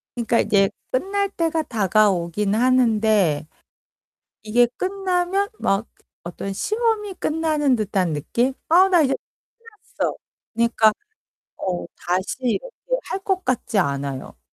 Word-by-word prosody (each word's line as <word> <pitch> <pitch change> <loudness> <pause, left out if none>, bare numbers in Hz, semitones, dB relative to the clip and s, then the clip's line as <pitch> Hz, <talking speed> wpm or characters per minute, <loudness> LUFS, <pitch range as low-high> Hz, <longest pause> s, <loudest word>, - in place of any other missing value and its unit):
그러니까 235 -1 +1
이게 195 -1 +3 0.2
끝날 395 +8 0
때가 330 -4 -1
다가오긴 200 - +1
하는데. 220 - +3 1.0
이게 240 +3 +4
끝나면 380 0 0
막 195 +3 0 0.4
어떤 175 +3 -5
시험이 430 - -1
끝나는 310 -5 +1
듯한 195 -5 0
느낌? 235 - 0 0.2
"아, 365 +4 +6
나 355 -2 +5
이제 275 -3 +2 0.4
끝났어." 460 -2 -5 0.4
그러니까 230 -2 +3 0.6
어, 180 -2 -3
다시 180 +2 -2
이렇게 - - -2
할 - - -4
것 380 -1 0
같지 250 -3 0
않아요. 140 -4 -3
240 Hz, 245 characters per minute, -22 LUFS, -, 1.0 s, 아